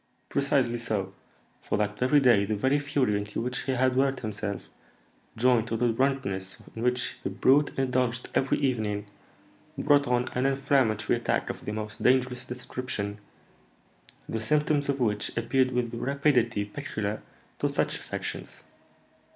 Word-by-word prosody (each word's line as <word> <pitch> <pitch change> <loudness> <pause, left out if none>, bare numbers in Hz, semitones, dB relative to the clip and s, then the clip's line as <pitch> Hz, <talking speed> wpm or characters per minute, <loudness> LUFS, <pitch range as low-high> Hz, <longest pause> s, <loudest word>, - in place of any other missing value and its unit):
"Precisely 135 -4 +1
so; 100 -5 -2 0.5
for - - -1
that 105 0 -1
very 130 +4 +4
day 120 -7 +5
the 105 +2 -1
very 130 +7 +2
fury 140 -6 +1
into 105 0 -3
which 125 +2 -3
he 135 - 0
had 130 0 +2
worked 135 0 +2
himself, 105 -2 -4 0.7
joined 120 -1 +3
to 115 - -1
the 120 +1 +2
drunkenness 110 -8 -1 0.2
in 115 - -5
which 125 0 0
the 95 - -2
brute 135 +9 +4
indulged 125 -2 0
every 135 - +2
evening, 110 -6 -1 0.7
brought 145 -1 +3
on 125 0 +1
an 130 +2 +1
inflammatory 135 -5 +2
attack - - 0
of - - -11
the - - -2
most 105 0 -5
dangerous 125 -1 +2
description, 125 -4 -5 1.1
the 110 - -3
symptoms 150 +2 +1
of 140 0 0
which 105 -4 -1
appeared 130 +2 +2
with 120 -2 -1
the 115 - -5
rapidity 125 -6 +1
peculiar 105 0 -4 0.4
to - - +1
such - - -1
affections. - - -6
125 Hz, 150 wpm, -28 LUFS, 110-135 Hz, 1.1 s, day